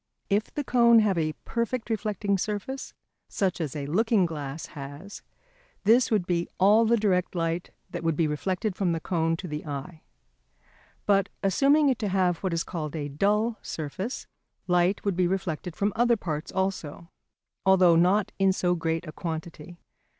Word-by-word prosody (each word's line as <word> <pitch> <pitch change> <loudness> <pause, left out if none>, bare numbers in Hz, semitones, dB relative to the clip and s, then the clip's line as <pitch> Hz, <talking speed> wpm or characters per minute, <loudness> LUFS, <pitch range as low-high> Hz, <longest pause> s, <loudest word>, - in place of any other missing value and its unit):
If 205 +2 +1
the 290 - -3
cone 235 -3 +5
have 205 -3 +2
a 155 -1 0
perfect 235 +1 -2
reflecting 210 -2 -1
surface, 215 +7 -4 0.3
such 185 -3 -1
as 150 -3 -3
a 145 -2 -3
looking 205 +5 +2
glass 150 -2 -5
has, 145 +7 -9 0.6
this 235 +5 +4
would 210 -6 +1
be 175 -1 -1
all 210 +4 +5
the 235 +1 +3
direct 185 -4 +1
light 165 0 -1 0.2
that - - -5
would 165 -1 +1
be 165 - +2
reflected 185 +6 -2
from 180 -3 0
the 165 - -2
cone 165 -1 0
to 180 - -7
the 150 -1 -5
eye. 155 +3 -6 1.0
But 195 -1 +3
assuming 280 +9 +4
it 255 - 0
to 215 - -1
have 185 -3 +1
what 190 - -2
is 165 0 0
called 155 -4 -5
a 145 -2 -3
dull 210 +9 +1
surface, 175 - -5 0.4
light 180 +2 +1
would 200 -3 +1
be 180 0 +2
reflected 180 -2 -3
from 205 0 0
other 235 0 +3
parts 155 -6 -4
also, 185 -3 -3 0.5
although 185 -3 +5
not 185 +4 +3
in 195 0 +4
so 180 -1 +1
great 165 0 -2
a - - -5
quantity. 165 0 -6
185 Hz, 170 wpm, -27 LUFS, 165-210 Hz, 1.0 s, cone